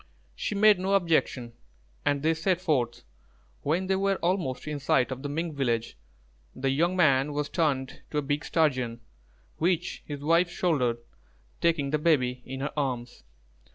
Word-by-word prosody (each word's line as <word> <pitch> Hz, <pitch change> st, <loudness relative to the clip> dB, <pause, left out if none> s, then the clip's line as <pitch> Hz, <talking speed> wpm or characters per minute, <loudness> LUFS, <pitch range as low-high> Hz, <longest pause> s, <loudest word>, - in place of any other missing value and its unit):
She 205 Hz, -, -3 dB
made 210 Hz, -1 st, +6 dB
no 190 Hz, +2 st, +1 dB
objection, 155 Hz, -9 st, +1 dB, 0.5 s
and 140 Hz, 0 st, +1 dB
they 160 Hz, +1 st, +3 dB
set 175 Hz, +3 st, 0 dB
forth. 130 Hz, -10 st, 0 dB, 0.6 s
When 165 Hz, +6 st, 0 dB
they 190 Hz, 0 st, +1 dB
were 195 Hz, 0 st, +1 dB
almost 170 Hz, -8 st, -1 dB
in 150 Hz, -1 st, -3 dB
sight 130 Hz, -2 st, +2 dB
of 130 Hz, 0 st, -5 dB
the 145 Hz, -, -4 dB
Mink 160 Hz, +1 st, -3 dB
village, 115 Hz, -, -1 dB, 0.6 s
the 135 Hz, +1 st, 0 dB
young 170 Hz, +6 st, +1 dB
man 145 Hz, -4 st, +3 dB
was 145 Hz, 0 st, -2 dB
turned 140 Hz, -6 st, -1 dB
to 150 Hz, -, -3 dB
a 150 Hz, -, +1 dB
big 145 Hz, +2 st, -1 dB
Sturgeon, 130 Hz, -7 st, 0 dB, 0.6 s
which 175 Hz, +1 st, 0 dB
his 145 Hz, -2 st, -5 dB
wife 170 Hz, +3 st, +3 dB
shouldered, 140 Hz, -10 st, +1 dB, 0.6 s
taking 155 Hz, -5 st, +1 dB
the 150 Hz, -, +1 dB
baby 130 Hz, -6 st, +2 dB
in 135 Hz, +1 st, -5 dB
her 145 Hz, -, -3 dB
arms. 125 Hz, -4 st, -3 dB
150 Hz, 160 wpm, -28 LUFS, 130-170 Hz, 0.6 s, made